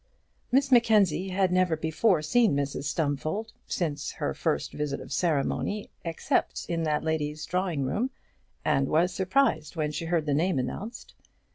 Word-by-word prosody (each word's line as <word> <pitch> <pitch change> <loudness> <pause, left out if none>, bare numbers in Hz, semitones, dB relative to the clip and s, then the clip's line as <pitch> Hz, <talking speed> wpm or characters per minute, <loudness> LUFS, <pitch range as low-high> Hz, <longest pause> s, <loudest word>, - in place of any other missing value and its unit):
Miss 270 +2 +3
Mackenzie 210 -7 +4
had 185 0 +1
never 180 -3 +2
before 160 +2 +2
seen 220 +2 +3
Mrs 140 0 -2
Stumfold 155 +8 -2
since 150 -5 -2
her - - -2
first 70 - -1
visit 145 -2 -2
of - - -7
ceremony, 170 +6 0
except 165 -1 -1
in 170 -1 -1
that 150 -1 0
lady's 150 -1 -2
drawing 180 -5 -1
room, 215 - 0 0.6
and 135 -3 +2
was 170 +5 +2
surprised 185 - +1
when 155 -2 -1
she 155 +2 -4
heard 165 -2 0
the 145 - +1
name 165 +2 +1
announced. 185 - -5
165 Hz, 150 wpm, -28 LUFS, 150-190 Hz, 0.6 s, Mackenzie